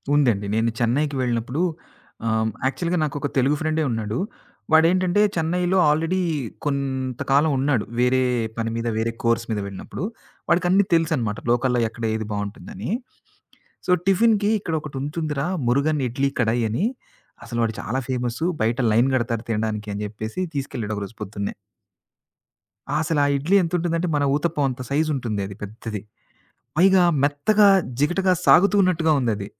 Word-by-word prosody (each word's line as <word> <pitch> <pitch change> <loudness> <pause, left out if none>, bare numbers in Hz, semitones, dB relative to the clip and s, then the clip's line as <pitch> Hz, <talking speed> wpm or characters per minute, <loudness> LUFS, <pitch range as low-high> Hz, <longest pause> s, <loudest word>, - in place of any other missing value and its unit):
ఉందండి. 120 -9 +2
నేను 115 +1 +2
చెన్నైకి 140 +5 +1
వెళ్ళినప్పుడు 125 +5 -1 0.7
ఆహ్, 110 0 +1 0.2
యాక్చువల్‌గా 170 +6 -1
నాకు 150 -2 -2
ఒక 145 - -1
తెలుగు 135 +3 +3
ఫ్రెండే 155 0 0
ఉన్నాడు. 110 -1 -2 0.5
వాడేంటంటే 175 +4 +4
చెన్నైలో 175 +3 +1
ఆల్రెడీ 165 +5 +1 0.5
కొంత 135 -3 -2
కాలం 145 +3 +4
ఉన్నాడు. 130 -4 +1
వేరే 125 +1 +3 0.4
పని 115 0 -1
మీద, 115 0 -2
వేరే 115 +1 0
కోర్స్ 115 0 +1
మీద 105 - -1
వెళ్ళినప్పుడు. 100 - -7 0.5
వాడికిన్ని 180 +3 +3
తెలుసన్నమాట. 155 -10 +1
లోకల్‌లో 125 0 +2
ఎక్కడ 115 +1 -10
ఏది 110 -1 -3
బావుంటుందని. 105 - -5 1.0
సో, - - +2
టిఫిన్‌కి 210 +1 +3
"ఇక్కడోకటుంటుంది‌రా, 150 -2 -3 0.2
మురుగన్ 140 +4 +2
ఇడ్లీ 135 +3 0
కడాయని, 115 - +1 0.6
అసలు 120 - -4
వాడు 110 -1 -1
చాలా 130 +5 -2
ఫేమస్సు, 125 +5 -1 0.2
బయట 115 +3 0
లైన్ 120 +4 +4
కడతారు 115 -2 -1
తినడానికి" 105 -1 -2
అని 105 - -4
చెప్పేసి, 110 - -5
తీసుకెళ్ళాడు 115 -6 -3
ఒకరోజు 100 +2 -6
పొద్దున్నే. 100 0 -4 1.5
అసలా 160 -3 +1
ఇడ్లీ 165 +8 +1
ఎంతుంటుందంటే, 170 0 -1
మన 145 - +1
ఊతప్పం 150 -1 0
అంత 130 0 -6
సైజుంటుంది 140 -8 0
అది 100 - -9
పెద్దది. 105 0 -6 0.8
పైగా 190 +2 +5 0.2
మెత్తగా 200 +9 +4 0.3
జిగటగా 185 +5 +2
సాగుతున్నట్టుగా 185 -5 +5
ఉందది. 110 -5 -1
135 Hz, 130 wpm, -23 LUFS, 115-165 Hz, 1.5 s, పైగా